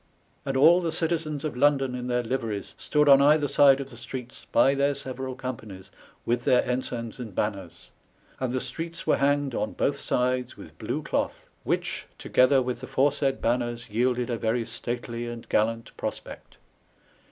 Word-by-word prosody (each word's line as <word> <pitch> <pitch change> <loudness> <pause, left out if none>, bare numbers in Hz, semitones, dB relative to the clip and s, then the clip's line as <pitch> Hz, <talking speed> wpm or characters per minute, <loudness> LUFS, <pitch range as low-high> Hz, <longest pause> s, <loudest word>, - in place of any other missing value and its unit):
And 135 -1 0
all 165 +6 +6
the 170 - -1
Gitizens 160 -3 -1
of 155 -5 -3
London 135 -1 +2
in 125 0 -4
their 125 0 0
Liveries 115 -4 -3
stood 150 -1 +1
on 140 -1 +8
either 150 +1 +4
side 140 -1 +5
of 135 0 -6
the 120 - -12
streets, 120 +1 -8
by 135 - +5
their 140 +1 +1
seurall 130 -1 -5
Gompanies, 110 -7 -7 0.3
with 120 0 0
their 125 - +4
Ensigns 125 -2 -3
and 110 -6 -7
Banners; 95 -5 -4 0.5
and 130 -2 -1
the 130 - 0
streets 165 +6 -6
were - - +3
hanged 140 -1 +1
on 110 - -2
both 140 0 0
sides 125 0 -1
with - - -12
blew - - -3
cloath, - - -2 0.2
which, - - -2
together 130 +1 +3
with 125 0 -4
the - - -7
foresaid 140 0 +1
Banners, 120 -1 -1
yielded 125 +2 0
a 115 - -2
very 115 +1 0
stately 120 +1 -4
and 120 -1 -7
gallant 115 +2 0
prospect. - - -7
125 Hz, 170 wpm, -26 LUFS, 120-140 Hz, 0.5 s, on